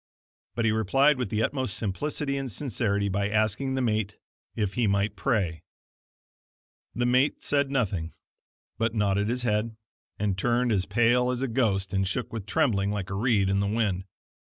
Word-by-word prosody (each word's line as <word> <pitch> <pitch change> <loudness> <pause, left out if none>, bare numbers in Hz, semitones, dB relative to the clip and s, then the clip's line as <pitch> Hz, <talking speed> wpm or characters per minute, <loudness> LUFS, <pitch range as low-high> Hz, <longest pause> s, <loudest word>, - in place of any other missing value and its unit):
But 115 - 0
he 110 - +3
replied 135 +7 +3
with 125 - -2
the 110 0 0
utmost 130 -7 -1
simplicity 140 +7 -2
and 135 -2 -3
sincerity, 100 -5 -1
by 100 +1 0
asking 110 +5 0
the 130 - 0
mate 105 -3 -1 0.4
if 105 -3 -1
he 120 -3 +1
might 100 +1 +1
pray. 95 - 0 1.3
The 120 - 0
mate 130 +3 +2
said 140 -1 +1
nothing, 95 -11 -1 0.6
but 115 0 0
nodded 105 0 +1
his 125 +1 -1
head, 110 0 0 0.4
and 100 -2 -1
turned 120 +3 +1
as 95 -4 +1
pale 120 +4 +3
as 125 +1 -1
a - - 0
ghost, 105 -6 0
and 95 0 +1
shook 115 +6 -3
with 105 -3 -5
trembling 110 -6 +1
like 100 -2 -3
a - - -2
reed 105 -1 +2
in 100 +1 +1
the 100 - +1
wind. 100 -4 0
110 Hz, 175 wpm, -27 LUFS, 100-125 Hz, 1.3 s, he